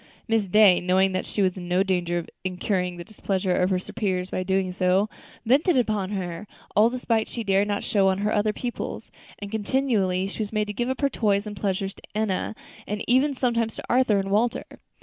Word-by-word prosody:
Miss 225 -3 +1
Day, 200 -1 +6
knowing 190 +2 +3
that 185 - -2
she 205 - 0
was 185 0 +1
in 175 -1 -7
no 180 +2 +2
danger 175 -3 0
of 170 - -4 0.2
incurring 180 -1 -1
the 175 - -6
displeasure 195 -2 -2
of 180 - +2
her 190 - +2
superiors 185 -1 -3
by - - -1
so - - -1
doing, 190 -1 0 0.7
vented 280 +7 +3
upon 210 -5 0
her 185 -1 -4 0.3
all 215 +3 +6
the 255 - -4
spite 225 -3 0
she 235 - -5
dared 200 0 +2
not 205 -1 -1
show 195 -2 +3
to 195 - -5
her 210 +1 0
other 210 0 +2
pupils; 240 +3 -5 0.3
and 205 -1 -8
continually 215 -5 0
she 200 - -8
was 210 -2 -2
made 215 -1 0
to 210 - -5
give 240 +4 -2
up 260 - -3
her 280 - +3
toys 205 -3 +1
and 210 -1 -6
pleasures 195 0 -2
to - - -17
Enna, 215 0 -1 0.3
and 210 0 -4
even 270 +4 +3
sometimes 235 -3 0
to - - -7
Arthur 245 -4 +3
and 195 0 -2
Walter. 230 +4 +1
205 Hz, 215 wpm, -25 LUFS, 185-220 Hz, 0.7 s, Day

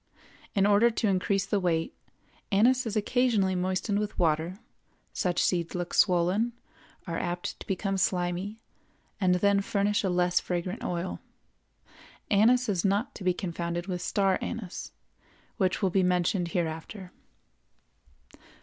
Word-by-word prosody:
In 195 -1 +4
order 205 +3 +5
to 225 -1 -1
increase 195 0 +1
the 200 +1 0
weight, 165 -3 0 0.6
anise 245 +5 +3
is 220 - -3
occasionally 215 -3 +2
moistened 185 +3 0
with 210 -1 -4
water; 165 +2 +1 0.6
such 180 -1 0
seeds 170 -2 0
look 175 -1 -4
swollen, 185 +6 +3 0.5
are 165 -3 -3
apt 175 0 -4
to - - -10
become 195 +1 -1
slimy, 180 +3 -1 0.6
and 185 -3 +3
then 200 +2 +3
furnish 205 +1 0
a 190 - +1
less 180 0 +2
fragrant 180 +1 -3
oil. 175 +1 -3 1.1
Anise 240 +5 +4
is 190 -5 0
not 200 +5 +1
to - - -9
be 180 -1 +2
confounded 170 -1 -3
with 180 -2 -4
star 195 0 +1
anise, 215 -6 -5 0.7
which 190 -2 0
will 190 - +2
be 190 - +3
mentioned 180 0 +1
hereafter. 170 +3 -4
185 Hz, 135 wpm, -28 LUFS, 175-205 Hz, 1.1 s, order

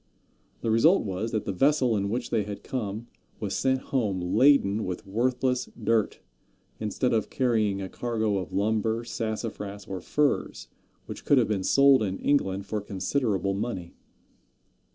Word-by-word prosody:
The 115 - 0
result 155 - +4
was 100 +2 -3
that 110 - -2
the - - -1
vessel 130 +3 +2
in 100 -1 -1
which 120 +3 -3
they 115 - +2
had 100 0 -6
come 110 -3 -4 0.3
was 100 -3 -3
sent 130 0 +1
home 105 -8 +1
laden 110 +2 +3
with 90 -1 -5
worthless 125 +5 0
dirt, 110 -1 0 0.6
instead 110 +4 -1
of 110 -2 0
carrying 110 -6 +1
a - - -4
cargo 110 -2 -1
of 90 - -6
lumber, 110 +3 0
sassafras, 110 -3 -5
or 95 -2 -6
furs, 115 - -1 0.4
which - - -8
could 145 - +4
have 120 - +3
been 100 -3 0
sold 140 +3 +5
in 95 -2 -1
England 100 -9 0
for 105 0 -3
considerable 100 0 -1
money. 95 -4 -4
110 Hz, 155 wpm, -27 LUFS, 100-125 Hz, 0.6 s, sold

